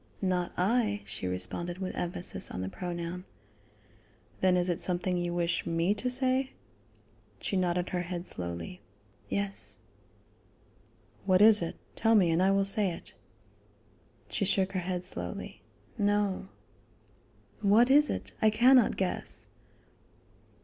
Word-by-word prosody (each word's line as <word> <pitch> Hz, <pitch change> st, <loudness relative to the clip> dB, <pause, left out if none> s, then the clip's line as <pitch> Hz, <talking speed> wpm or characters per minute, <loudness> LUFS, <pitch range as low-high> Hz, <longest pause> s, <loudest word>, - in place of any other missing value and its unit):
"Not 180 Hz, -2 st, 0 dB
I," 210 Hz, +2 st, +1 dB
she 95 Hz, -, -4 dB
responded 95 Hz, -, -3 dB
with 185 Hz, -1 st, -4 dB
emphasis 175 Hz, 0 st, 0 dB
on 90 Hz, -, -5 dB
the 95 Hz, -, -3 dB
pronoun. 175 Hz, -, -5 dB, 1.2 s
"Then 185 Hz, -1 st, +3 dB
is 180 Hz, 0 st, +1 dB
it 175 Hz, -2 st, -1 dB
something 180 Hz, 0 st, 0 dB
you 175 Hz, 0 st, -1 dB
wish 175 Hz, 0 st, -1 dB
me 165 Hz, +3 st, +1 dB
to 245 Hz, +4 st, -3 dB
say?" 260 Hz, +1 st, +1 dB, 0.9 s
She -, -, -3 dB
nodded 180 Hz, -1 st, 0 dB
her 180 Hz, -, -1 dB
head 175 Hz, 0 st, -5 dB
slowly: 85 Hz, 0 st, -5 dB, 0.5 s
"Yes." 200 Hz, 0 st, -2 dB, 1.5 s
"What 185 Hz, -1 st, +4 dB
is 215 Hz, -1 st, +7 dB
it? 165 Hz, -, -3 dB, 0.2 s
Tell 225 Hz, 0 st, +3 dB
me 180 Hz, -5 st, +4 dB
and 165 Hz, +2 st, +2 dB
I 190 Hz, -, +4 dB
will 195 Hz, 0 st, +2 dB
say 200 Hz, 0 st, +3 dB
it." 170 Hz, -, -8 dB, 1.1 s
She 110 Hz, -, -2 dB
shook 190 Hz, -1 st, +1 dB
her 190 Hz, -, -2 dB
head 180 Hz, 0 st, -3 dB
slowly: 185 Hz, -, -3 dB, 0.4 s
"No." 205 Hz, -, +1 dB, 1.1 s
"What 225 Hz, +6 st, +5 dB
is 295 Hz, +2 st, +6 dB
it? -, -, -4 dB
I 220 Hz, -, +5 dB
cannot 245 Hz, +2 st, +5 dB
guess." 190 Hz, -2 st, -2 dB
185 Hz, 135 wpm, -29 LUFS, 175-205 Hz, 1.5 s, is